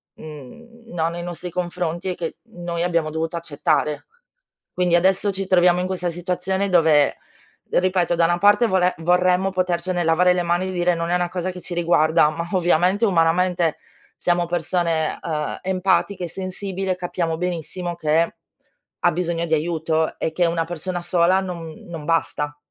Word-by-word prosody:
uhm, 200 - -12
no 165 -1 0
nei 170 0 -6
nostri 175 0 -6
confronti, 175 0 -3
e 180 - -2
che 165 -2 -5 0.2
noi 175 -1 -4
abbiamo 170 -3 0
dovuto 160 +1 -3
accettare. 150 -1 -1 0.7
Quindi 175 -1 +3
adesso 190 +3 +2
ci 195 0 -3
troviamo 180 -1 +4
in 180 - -1
questa 180 -2 -2
situazione 180 +3 -2
dove, 160 -5 +4 0.5
ripeto, 180 -1 +2
da 170 - +3
una 175 +1 +2
parte 205 +5 +5
vole 185 -3 +2
vorremmo 180 +2 +2
potercene 180 -1 -1
lavare 180 +3 +4
le 180 -1 0
mani 175 +2 0
e - - -4
dire 175 0 +1
non 170 0 -3
è - - +2
una 175 0 +1
cosa 180 +1 -3
che 180 0 -8
ci 175 - -6
riguarda, 160 -2 +3
ma 170 +2 -5
ovviamente 180 +3 +2
umanamente, 175 -1 +2 0.4
siamo 175 0 +1
persone, 170 -2 -1
uhm, 150 -2 -3
empatiche 190 0 0
e - - -4
sensibile, 190 +1 -4
capiamo 175 -2 -2
benissimo 175 0 -4
che 160 +1 +1 0.7
ha - - +3
bisogno 170 0 -1
di 160 - -2
aiuto 160 0 0
e 160 - -1
che 175 +2 +1
una 165 0 0
persona 175 +2 -4
sola 175 +1 +3
no 170 -4 -6
non 165 -3 -7
basta. 150 -3 -1
175 Hz, 165 wpm, -22 LUFS, 165-185 Hz, 0.7 s, parte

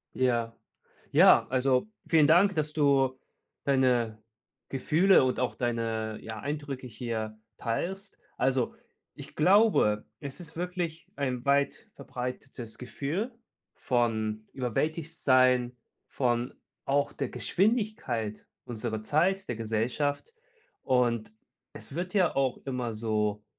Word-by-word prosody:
Ja, 120 -3 0 0.6
ja, - - +7
also 130 +6 +2 0.2
vielen 155 -3 +5
Dank, 180 +6 +5
dass 155 -2 -1
du 135 -3 +2 0.5
deine 125 -5 +2 0.5
Gefühle 160 +8 +4
und 130 - 0
auch 125 - 0
deine, 115 -2 -2
ja, 110 -1 -6
Eindrücke 140 -2 -4
hier 110 -2 -4 0.2
teilst. 190 +12 -3 0.2
Also, 130 -1 +1 0.4
ich - - -11
glaube, 180 - +4
es 140 +3 -6
ist 165 -2 -9
wirklich 175 -2 -4
ein 130 -3 -2
weit 140 0 +1
verbreitetes 125 -2 -7
Gefühl 155 - -3 0.4
von 110 -3 -1
überwältigt 155 +6 -2
sein, 125 -2 +3 0.3
von 120 -1 -1 0.3
auch 140 +1 +1
der 135 - -3
Geschwindigkeit, 135 - -1 0.2
unserer 110 -2 -4
Zeit, 185 - +1
der - - -2
Gesellschaft 120 - -2 0.5
und 120 -4 +1 0.4
es - - -10
wird 180 +3 -4
ja 185 -4 +3
auch 135 -2 +1
immer 125 -4 -2
so- 105 -1 -1
130 Hz, 110 wpm, -29 LUFS, 115-150 Hz, 0.6 s, ja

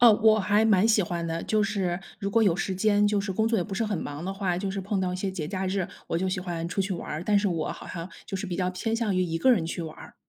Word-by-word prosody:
哦， 240 -2 +9
我 220 -1 +6
还 205 +2 +3
蛮 215 -2 +5
喜 215 -2 +4
欢 170 -1 -3
的， 165 0 -2
就 215 -1 +2
是 195 -4 0 0.2
如 200 - -2
果 230 +2 +4
有 195 -6 +4
时 195 -1 -1
间 205 +1 +3
就 205 -1 +2
是 200 -1 -3
工 220 +4 +1
作 225 0 +2
也 - - +1
不 200 - -9
是 225 - 0
很 210 -2 -1
忙 145 +3 -5
的 190 - -2
话， 195 -3 -1
就 195 +1 -2
是 195 +1 -3
碰 195 +1 -1
到 185 -1 0
一 - - -2
些 190 +1 -2
节 180 -5 -4
假 190 +2 -2
日， 190 -1 0 0.2
我 - - 0
就 190 +2 0
喜 185 0 -1
欢 170 -2 -3
出 180 - -1
去 195 0 -1
玩 175 - -5
儿， 155 +3 -3
但 205 +1 +4
是 205 - +1
我 165 -4 -1
好 - - -10
像 170 0 -6 0.2
就 195 - -3
是 195 +2 -4
比 180 -2 -3
较 180 -1 0
偏 205 +5 -2
向 225 -4 0
于 185 - +2
一 165 -2 -1
个 260 - +4
人 185 -8 +2
去 165 +1 -4
玩 160 -1 -7
儿。 - - -12
190 Hz, 350 characters per minute, -27 LUFS, 180-210 Hz, 0.2 s, 哦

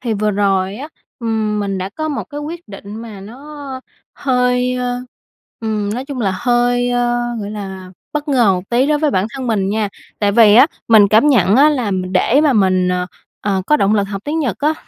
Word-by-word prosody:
thì 235 -3 -2
vừa 210 +1 0
rồi 195 -1 0
á, 280 +6 -7 0.3
ừm, 220 -2 -1
mình 195 -2 -2
đã 185 - -3
có 310 +10 -4
một 295 - -3
cái 290 -1 -8
quyết 330 +1 -7
định 200 +1 -9
mà 220 -3 -9
nó 270 +5 -9 0.3
hơi, 250 -1 +1
ơ, 250 0 -2 0.6
ừm, 215 -2 -2
nói 250 +3 -4
chung 275 -2 -6
là 195 -4 0
hơi, 245 0 +1
ơ, 240 0 +1 0.2
gọi 205 - -5
là, 190 -3 -7 0.2
bất 300 0 -3
ngờ 240 -8 +4
một 180 -1 -2
tí 245 +3 +2
đối 300 0 +2
với 300 -1 +1
bản 190 -5 0
thân 265 -2 -5
mình 200 -5 0
nha, 215 0 -1 0.3
tại 205 -1 +1
vì 210 -1 +6
á, 250 +5 +8 0.2
mình 215 -3 +6
cảm 220 +8 +4
nhận 215 -5 +4
á 295 +3 +6
là 250 -8 -1
m 185 -1 -3
để 240 +9 +3
mà 300 -3 +3
mình, 185 -4 +2
ờ, 180 0 -1 0.3
ờ, 195 -2 -1
có 300 - +4
động 205 -6 +2
lực 205 - +2
học 195 0 -6
tiếng 305 +2 -2
Nhật 260 - -1
á, 300 +2 +1
225 Hz, 220 wpm, -17 LUFS, 200-260 Hz, 0.6 s, á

